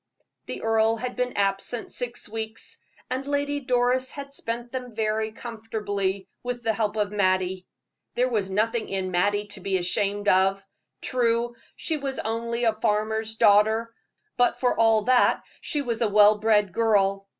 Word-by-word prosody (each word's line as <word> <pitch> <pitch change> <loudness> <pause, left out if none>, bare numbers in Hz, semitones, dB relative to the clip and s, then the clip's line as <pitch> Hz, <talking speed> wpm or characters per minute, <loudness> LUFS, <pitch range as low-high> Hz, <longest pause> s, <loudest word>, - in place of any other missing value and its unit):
The - - -6
earl 225 0 +3
had 245 +2 -5
been 250 0 -2
absent 200 +4 -1
six 245 -1 -5
weeks, 220 +1 -6 0.3
and 265 +2 -2
Lady 285 0 0
Doris 255 -1 +1
had 280 -1 -8
spent 240 -2 -5
them 250 -3 -6
very 220 0 0
comfortably, 210 -4 -3
with 245 -1 -4
the 225 0 +1
help 215 -1 -1
of 205 -1 0
Mattie. 185 -2 0 0.5
There 250 +1 +2
was 210 -6 -1
nothing 220 +4 0
in 190 -1 -2
Mattie 205 +4 +1
to - - -7
be 190 0 0
ashamed 200 +3 -1
of. 195 +1 +3 0.4
True, 235 -1 0 0.2
she 320 - -2
was 275 -2 -4
only 235 +2 -2
a 225 -2 +3
farmer's 220 0 -1
daughter; 220 +2 +4 0.4
but 245 0 +2
for 250 - +2
all 225 -1 +4
that 250 +2 +3 0.2
she 295 -2 -2
was 235 -3 -3
a 230 - +3
well 210 +1 +6
bred 210 -3 +2
girl. 195 -3 +2
220 Hz, 160 wpm, -25 LUFS, 205-240 Hz, 0.5 s, well